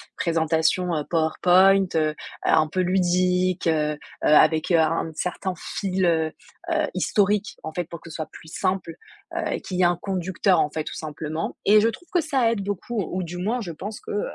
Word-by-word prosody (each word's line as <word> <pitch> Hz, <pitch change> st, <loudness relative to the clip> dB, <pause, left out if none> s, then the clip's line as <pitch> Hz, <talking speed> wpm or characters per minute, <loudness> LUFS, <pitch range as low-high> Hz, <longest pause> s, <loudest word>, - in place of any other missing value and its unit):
présentations, 165 Hz, +1 st, +1 dB
heu, 150 Hz, -, -1 dB
PowerPoint, 185 Hz, +4 st, +4 dB
heu, 155 Hz, -1 st, +2 dB, 0.3 s
un 155 Hz, -, +4 dB
un -, -, -8 dB
peu 185 Hz, +4 st, -3 dB
ludiques, 180 Hz, 0 st, +1 dB
heu, 150 Hz, -2 st, +2 dB
heu, -, -, -9 dB, 0.2 s
avec, 155 Hz, +2 st, +4 dB
heu, 170 Hz, -, +5 dB
un 160 Hz, +1 st, +1 dB
certain 180 Hz, +3 st, -3 dB
fil, 190 Hz, 0 st, -2 dB
heu, 160 Hz, -2 st, +2 dB, 0.4 s
heu, 315 Hz, -2 st, +1 dB
historique 205 Hz, +2 st, +1 dB
en 160 Hz, -, -5 dB
fait, 175 Hz, -, -1 dB
pour 170 Hz, 0 st, -10 dB
que 170 Hz, -, -12 dB
ce -, -, -9 dB
soit 155 Hz, -, -5 dB
plus 160 Hz, -, -13 dB
simple, 185 Hz, -3 st, -1 dB, 0.4 s
heu -, -, -1 dB
et -, -, -2 dB
qu'il 185 Hz, -, -5 dB
y -, -, +2 dB
ait -, -, +5 dB
un 175 Hz, -1 st, +2 dB
conducteur 185 Hz, -1 st, +1 dB
en 150 Hz, -, 0 dB
fait 155 Hz, +1 st, -3 dB
tout -, -, -6 dB
simplement 155 Hz, +1 st, -5 dB
et 210 Hz, +1 st, +6 dB
je 225 Hz, -, +3 dB
trouve 290 Hz, +10 st, -9 dB
que 350 Hz, -, +3 dB
ça 265 Hz, -7 st, +1 dB
aide 220 Hz, -, -2 dB
beaucoup, 205 Hz, +3 st, -3 dB
ou 185 Hz, +1 st, -2 dB
du 175 Hz, +1 st, -6 dB
moins 220 Hz, +7 st, -1 dB
je 175 Hz, -6 st, -5 dB
pense 205 Hz, +7 st, -7 dB
que, -, -, -9 dB
heu, 205 Hz, -, -2 dB
180 Hz, 215 wpm, -24 LUFS, 160-195 Hz, 0.4 s, et